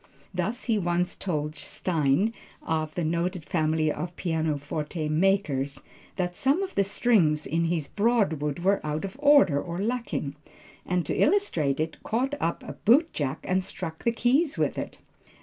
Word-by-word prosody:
Thus 200 Hz, +8 st, -2 dB
he 225 Hz, -4 st, +1 dB
once 175 Hz, -1 st, 0 dB
told 150 Hz, -5 st, -2 dB
Stein, 160 Hz, +5 st, 0 dB, 0.3 s
of 155 Hz, -1 st, -2 dB
the 175 Hz, -, -1 dB
noted 170 Hz, +1 st, -1 dB
family 155 Hz, -1 st, +1 dB
of 175 Hz, +2 st, -5 dB
pianoforte 155 Hz, -1 st, -2 dB
makers 155 Hz, -5 st, +1 dB, 0.3 s
that 180 Hz, -1 st, -2 dB
some 280 Hz, -, +2 dB
of 385 Hz, -, -5 dB
the 200 Hz, -, +3 dB
strings 190 Hz, -7 st, +2 dB
in 165 Hz, +1 st, 0 dB
his 165 Hz, -4 st, -1 dB
Broadwood 200 Hz, -, +1 dB
were 195 Hz, +2 st, +3 dB
out 150 Hz, +3 st, -2 dB
of 195 Hz, -, -7 dB
order 285 Hz, -, +5 dB
or 170 Hz, -1 st, -5 dB
lacking, 210 Hz, -, -2 dB, 0.5 s
and 180 Hz, -2 st, 0 dB
to -, -, -2 dB
illustrate 165 Hz, -, +2 dB
it, 160 Hz, +1 st, -2 dB
caught 255 Hz, +5 st, -1 dB
up 170 Hz, -, -1 dB
a -, -, -7 dB
bootjack 210 Hz, -, +3 dB
and 185 Hz, 0 st, +1 dB
struck 165 Hz, -4 st, -6 dB
the 235 Hz, -, +3 dB
keys 270 Hz, +7 st, +2 dB
with -, -, +1 dB
it. -, -, -5 dB
175 Hz, 155 wpm, -27 LUFS, 155-210 Hz, 0.5 s, order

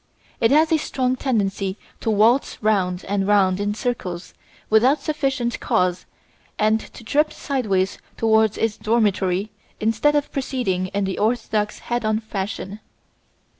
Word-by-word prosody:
It 225 Hz, -, +4 dB
has 310 Hz, +3 st, +4 dB
a 320 Hz, -, +4 dB
strong 255 Hz, -3 st, -1 dB
tendency 200 Hz, -7 st, -1 dB, 0.2 s
to -, -, -2 dB
waltz 220 Hz, +5 st, +3 dB
round 190 Hz, -4 st, +1 dB
and 195 Hz, -1 st, 0 dB
round 195 Hz, -2 st, +3 dB
in 205 Hz, 0 st, -1 dB
circles 190 Hz, -8 st, -4 dB, 0.3 s
without 245 Hz, +7 st, +4 dB
sufficient 270 Hz, -6 st, -1 dB
cause 180 Hz, 0 st, 0 dB, 0.5 s
and 215 Hz, +1 st, +3 dB
to 235 Hz, -, -12 dB
trip 300 Hz, +6 st, +1 dB
sideways 200 Hz, -9 st, -1 dB, 0.2 s
towards 220 Hz, -1 st, +3 dB
its 225 Hz, -1 st, 0 dB
dormitory 205 Hz, -3 st, +1 dB, 0.3 s
instead 225 Hz, +7 st, +2 dB
of 290 Hz, 0 st, 0 dB
proceeding 245 Hz, -10 st, -1 dB
in 200 Hz, +2 st, -2 dB
the 190 Hz, -1 st, -2 dB
orthodox 215 Hz, -1 st, 0 dB
head 240 Hz, 0 st, -1 dB
on 215 Hz, 0 st, +1 dB
fashion. 205 Hz, -1 st, -5 dB
215 Hz, 135 wpm, -22 LUFS, 195-245 Hz, 0.5 s, It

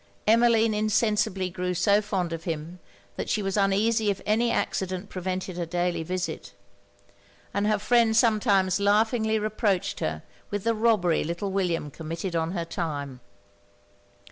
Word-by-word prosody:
Emmeline 230 Hz, 0 st, +4 dB
insensibly 210 Hz, -3 st, +1 dB
grew 180 Hz, +1 st, -2 dB
so 200 Hz, +4 st, +3 dB
fond 190 Hz, -5 st, -2 dB
of 165 Hz, 0 st, -6 dB
him, 165 Hz, +2 st, -5 dB, 0.4 s
that -, -, -4 dB
she 210 Hz, -, 0 dB
was 195 Hz, -1 st, -2 dB
uneasy 210 Hz, +2 st, +2 dB
if 200 Hz, -, -1 dB
any 225 Hz, +3 st, +2 dB
accident 185 Hz, -2 st, -2 dB
prevented 185 Hz, 0 st, -4 dB
her 175 Hz, -, -2 dB
daily 175 Hz, 0 st, -1 dB
visit; 175 Hz, -, -4 dB, 1.0 s
and 200 Hz, +1 st, 0 dB
her 215 Hz, 0 st, +2 dB
friend 225 Hz, +1 st, +3 dB
sometimes 205 Hz, -5 st, +3 dB
laughingly 220 Hz, +2 st, +2 dB
reproached 215 Hz, -3 st, -1 dB
her 80 Hz, 0 st, -3 dB, 0.3 s
with 205 Hz, -1 st, -3 dB
the 230 Hz, -, +2 dB
robbery 215 Hz, -7 st, +2 dB
little 170 Hz, +5 st, -3 dB
William 175 Hz, -6 st, -1 dB
committed 165 Hz, +3 st, -5 dB
on 165 Hz, +1 st, -1 dB
her 170 Hz, -3 st, -2 dB
time. 145 Hz, -6 st, -4 dB
195 Hz, 140 wpm, -26 LUFS, 175-215 Hz, 1.0 s, Emmeline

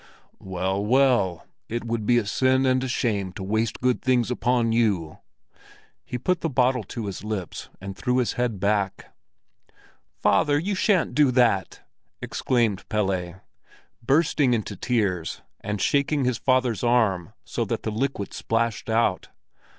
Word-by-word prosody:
"Well, 95 Hz, +1 st, -2 dB
well, 115 Hz, -7 st, +2 dB, 0.2 s
it 120 Hz, +1 st, -3 dB
would 115 Hz, -2 st, -3 dB
be 120 Hz, -, +4 dB
a 115 Hz, -, +1 dB
sin 130 Hz, +5 st, +2 dB
and 130 Hz, 0 st, +2 dB
a -, -, -2 dB
shame 105 Hz, -6 st, -1 dB
to 95 Hz, -, -7 dB
waste 110 Hz, +3 st, -1 dB
good 125 Hz, 0 st, +1 dB
things 125 Hz, -2 st, +1 dB
upon 120 Hz, -2 st, +1 dB
you." 100 Hz, -9 st, 0 dB, 0.8 s
He 125 Hz, -, -5 dB
put 180 Hz, +8 st, 0 dB
the 165 Hz, -, -1 dB
bottle 125 Hz, -2 st, +2 dB
to 115 Hz, -3 st, -6 dB
his 100 Hz, -1 st, -6 dB
lips 105 Hz, -5 st, -5 dB
and 95 Hz, 0 st, -7 dB
threw 125 Hz, +4 st, -1 dB
back -, -, +3 dB
his 125 Hz, -, 0 dB
head. 105 Hz, -4 st, 0 dB, 1.3 s
"Father, 145 Hz, 0 st, +3 dB
you 190 Hz, +7 st, -1 dB
shan't 190 Hz, -, +2 dB
do 145 Hz, +1 st, +4 dB
that!" 120 Hz, -7 st, +2 dB, 0.4 s
exclaimed 115 Hz, -6 st, 0 dB
Pelle, 95 Hz, -4 st, -1 dB, 0.6 s
bursting 140 Hz, -1 st, +2 dB
into 110 Hz, -2 st, -4 dB
tears 95 Hz, -7 st, -1 dB, 0.2 s
and 105 Hz, 0 st, -4 dB
shaking 140 Hz, +4 st, +1 dB
his 125 Hz, -2 st, 0 dB
father's 130 Hz, -4 st, +1 dB
arm 110 Hz, -8 st, +1 dB
so -, -, -2 dB
that -, -, -3 dB
the 110 Hz, -, -2 dB
liquid 110 Hz, -3 st, -2 dB
splashed 115 Hz, 0 st, -1 dB
out. 110 Hz, -4 st, +1 dB
115 Hz, 150 wpm, -25 LUFS, 100-130 Hz, 1.3 s, be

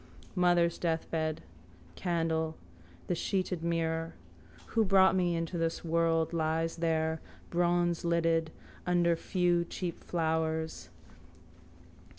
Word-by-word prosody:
Mother's 175 Hz, -2 st, +3 dB
deathbed. 160 Hz, -, -1 dB, 0.5 s
Candle. 165 Hz, -2 st, -1 dB, 0.5 s
The -, -, -1 dB
sheeted 180 Hz, 0 st, -1 dB
mirror. 165 Hz, -1 st, -1 dB, 0.6 s
Who 225 Hz, -, +4 dB
brought 190 Hz, -1 st, +5 dB
me 175 Hz, -2 st, +2 dB
into 165 Hz, +1 st, -2 dB
this 165 Hz, +1 st, -1 dB
world 165 Hz, 0 st, +1 dB
lies 165 Hz, 0 st, 0 dB
there, 160 Hz, -1 st, 0 dB, 0.3 s
bronzelidded, 170 Hz, -1 st, +2 dB, 0.4 s
under 175 Hz, -1 st, +3 dB
few 175 Hz, 0 st, +1 dB
cheap 170 Hz, 0 st, -5 dB
flowers. 160 Hz, -1 st, -1 dB
165 Hz, 95 wpm, -31 LUFS, 160-175 Hz, 0.6 s, brought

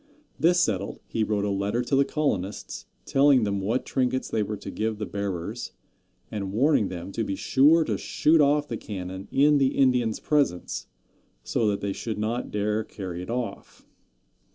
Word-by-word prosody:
This 175 Hz, +2 st, +4 dB
settled, 100 Hz, -, 0 dB
he 110 Hz, -, -1 dB
wrote 105 Hz, -1 st, 0 dB
a 100 Hz, -, 0 dB
letter 100 Hz, +5 st, 0 dB
to 135 Hz, -, 0 dB
the 140 Hz, -, +5 dB
colonists, 105 Hz, -, -3 dB, 0.2 s
telling 135 Hz, -3 st, +4 dB
them 100 Hz, -1 st, -1 dB
what 115 Hz, +7 st, -1 dB
trinkets 130 Hz, 0 st, -1 dB
they 110 Hz, -, 0 dB
were 105 Hz, 0 st, -3 dB
to -, -, -8 dB
give 110 Hz, 0 st, -2 dB
the 105 Hz, -, -3 dB
bearers, 100 Hz, +3 st, -4 dB, 0.6 s
and 100 Hz, -3 st, -3 dB
warning 120 Hz, -1 st, +3 dB
them 90 Hz, +1 st, -6 dB
to 115 Hz, -, -2 dB
be 100 Hz, -, -2 dB
sure 150 Hz, +10 st, +4 dB
to -, -, -2 dB
shoot 155 Hz, +1 st, +3 dB
off 145 Hz, +1 st, +3 dB
the 115 Hz, -, -4 dB
cannon 95 Hz, -2 st, -6 dB
in 145 Hz, +1 st, +4 dB
the 135 Hz, -1 st, +1 dB
Indians' 125 Hz, -4 st, +2 dB
presence, 140 Hz, -13 st, 0 dB, 0.6 s
so 110 Hz, -, 0 dB
that 100 Hz, -1 st, 0 dB
they 100 Hz, -1 st, -2 dB
should 110 Hz, +1 st, -4 dB
not 110 Hz, +3 st, -2 dB
dare 105 Hz, +1 st, 0 dB
carry 95 Hz, -5 st, -6 dB
it 90 Hz, -, -8 dB
off. 120 Hz, -4 st, -5 dB
110 Hz, 175 wpm, -26 LUFS, 100-135 Hz, 0.6 s, the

